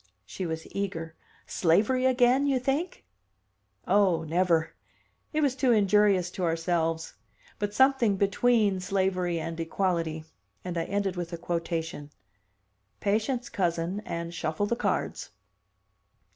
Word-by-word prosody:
She 185 - -5
was 160 0 -4
eager. 165 -5 -4 0.3
"Slavery 220 +10 +2
again, 255 +2 +3
you 275 -2 +2
think?" 275 +8 -2 0.8
"Oh, 185 -4 +3
never! 165 0 +1 0.6
It 310 - 0
was 280 -3 +2
too 260 -2 +2
injurious 200 -4 +3
to 185 - -5
ourselves. 165 -1 -1 0.5
But 205 0 -2
something 265 -6 +4
between 205 0 +2
slavery 185 -2 0
and 165 +1 -5
equality." 165 -2 -1 0.4
And 180 -1 -4
I 165 - -1
ended 200 -2 -1
with 175 0 -4
a - - -3
quotation: 165 -3 -3 0.9
"'Patience, 225 +5 0
cousin, 175 +1 -1
and 170 0 -5
shuffle 165 +3 -1
the 235 - 0
cards. - - -2
185 Hz, 120 wpm, -28 LUFS, 165-215 Hz, 0.9 s, something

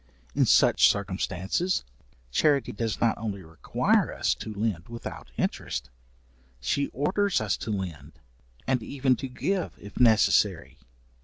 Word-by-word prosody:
In - - +3
such - - +6
circumstances, 100 - -1 0.5
charity 140 - +2
does 110 -1 -3
not 115 -1 +1
only 100 -3 -4
require 80 -1 +1
us - - +1
to 110 - -7
lend 105 -4 -2
without 115 - -8
interest, - - -2 0.7
she 140 - 0
orders 195 - 0
us 105 -5 0
to - - -6
lend, 85 -8 -4 0.5
and 130 -2 +1
even 130 +2 +1
to 135 - -4
give 185 +9 -2
if 100 - -10
necessary. 115 -4 +3
110 Hz, 130 wpm, -27 LUFS, 95-135 Hz, 0.7 s, such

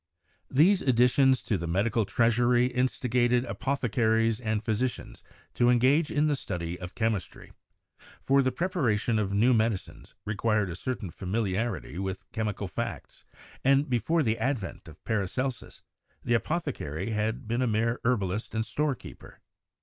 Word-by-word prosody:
These 175 +8 +4
ad 130 -3 +2
ditions 130 +1 +4
to 105 -5 0
the 85 - -4
medical 105 +6 +1
treasury 120 +3 +3
instigated 125 -1 +1
apothecaries 115 -4 0
and 110 -2 -2
physicians 115 +3 -2 0.3
to 120 0 +3
engage 130 +6 +3
in 150 +1 +1
the 150 -1 +2
study 85 -8 -4
of 90 0 -8
chemistry; 110 -5 -3 0.7
for 140 +1 +3
the 130 -1 +1
preparation 120 - 0
of 100 -2 -1
new 115 +6 +4
medicines 110 -3 -2
required 105 -2 0
a - - -5
certain 105 -3 -4
familiarity 100 - -2
with 95 -1 -4
chemical 105 -2 -3
facts, 90 - -6 0.4
and 135 +1 +3
before 150 +8 +1
the 115 -1 0
advent 130 -12 -3
of 80 -1 -14
Paracelsus, 120 +5 -3 0.4
the 120 - 0
apothecary 115 - -2
had 110 +3 -2
been 120 +3 0
a 125 - +2
mere 115 +2 0
herbalist 105 -4 -1
and 110 0 0
storekeeper. 145 -3 -4
115 Hz, 140 wpm, -28 LUFS, 105-130 Hz, 0.7 s, These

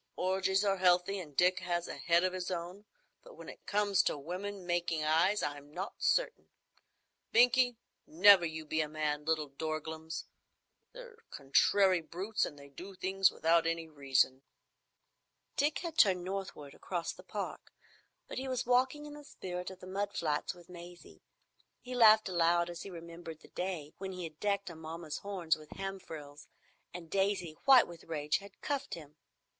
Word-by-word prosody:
"Orgies 190 +2 +1
are 195 -1 +2
healthy, 180 +2 +3
and 150 -6 -10
Dick 180 +1 +4
has 175 -1 -2
a - - -5
head 170 0 +3
of 185 0 +1
his 185 -1 -3
own, 180 +3 -5 0.4
but - - -15
when - - -11
it - - -12
comes 205 -1 +3
to - - -1
women 185 +6 -6
making 175 -2 0
eyes 165 +7 +3
I'm 145 0 -5
not 185 +5 -5
so - - +4
certain,—Binkie, 250 - -1 0.3
never 205 - +7
you 160 -1 -4
be 155 +1 0
a 150 - -2
man, 150 -1 -2
little 155 -2 0
dorglums. 160 +2 -4 0.7
They're - - -12
contrary 180 +6 +3
brutes, 190 +7 -2
and 145 - -10
they 140 0 -12
do 180 +8 -10
things 190 +1 +3
without 165 0 +2
any 165 0 -2
reason." 135 -3 +1 1.1
Dick 290 +2 +1
had 330 -2 -4
turned 185 -3 +5
northward 185 -7 -5
across 175 -3 -4
the - - -13
Park, - - -6 0.6
but - - -5
he 265 - -4
was 255 -1 -2
walking 260 +5 +2
in 295 - -9
the 295 0 -10
spirit 180 -9 -6
on 190 - -10
the - - -11
mud 200 +2 -3
flats 150 0 -1
with 175 -1 -16
Maisie. 175 0 -12 0.6
He 250 - -8
laughed 220 -3 +7
aloud 170 -1 +2
as 175 - -8
he - - -7
remembered 165 -2 -9
the - - -16
day 175 -5 -4
when 190 0 -5
he 180 -1 -6
had 160 -2 -8
decked 200 -2 -1
Amomma's 160 -1 -6
horns 185 -6 -1
with 155 -1 -14
the - - -11
ham 195 0 -4
frills, 145 -4 -10 0.4
and 170 -2 -9
Maisie, 195 -5 0
white 265 -3 +8
with 170 -1 -12
rage, 150 -2 -1
had 200 0 -15
cuffed 280 -2 -2
him. 150 -3 -12
180 Hz, 175 wpm, -33 LUFS, 160-200 Hz, 1.1 s, white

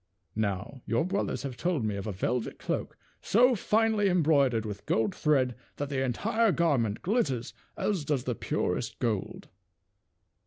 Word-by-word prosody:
Now 105 +4 -2
your 115 +7 +1
brothers 195 -4 -1
have 135 -3 -4
told 165 -5 0
me 105 -1 -1
of 100 +1 -5
a - - -1
velvet 110 +5 -2
cloak - - -3 0.2
so 250 +5 +4
finely 220 -1 +2
embroidered 140 - +3
with 105 -2 -7
gold 110 -3 +1
thread 135 -5 +2 0.2
that 145 -1 -4
the 135 -2 0
entire 220 - +1
garment 140 - +1
glitters 165 - 0 0.2
as 195 -7 0
does 145 -3 0
the 125 - -1
purest - - -2
gold. 110 -5 -2
135 Hz, 150 wpm, -29 LUFS, 115-185 Hz, 0.2 s, so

